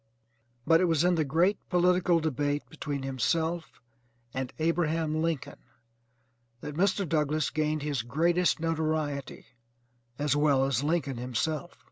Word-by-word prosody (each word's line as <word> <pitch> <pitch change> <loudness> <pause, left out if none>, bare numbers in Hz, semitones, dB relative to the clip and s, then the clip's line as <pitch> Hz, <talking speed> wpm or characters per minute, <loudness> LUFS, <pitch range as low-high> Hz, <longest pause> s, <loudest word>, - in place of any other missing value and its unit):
But 165 +1 +5
it - - +4
was 165 -2 +2
in 180 0 +4
the 160 -2 +2
great 170 +8 +2
political 180 -1 +3
debate 145 -1 -1
between 145 -3 -4
himself 160 +1 -1 0.5
and 130 -1 -3
Abraham 160 -1 0
Lincoln 165 -4 -2 1.0
that 150 - -6
Mr. 190 +2 +1
Douglass 155 -1 0
gained 155 -1 -1
his 145 -5 -1
greatest 170 +9 +1
notoriety 155 -3 -2 0.7
as 145 -1 +1
well 145 -3 +3
as 135 -1 0
Lincoln 145 -4 0
himself. 150 +8 -3
155 Hz, 125 wpm, -28 LUFS, 145-165 Hz, 1.0 s, But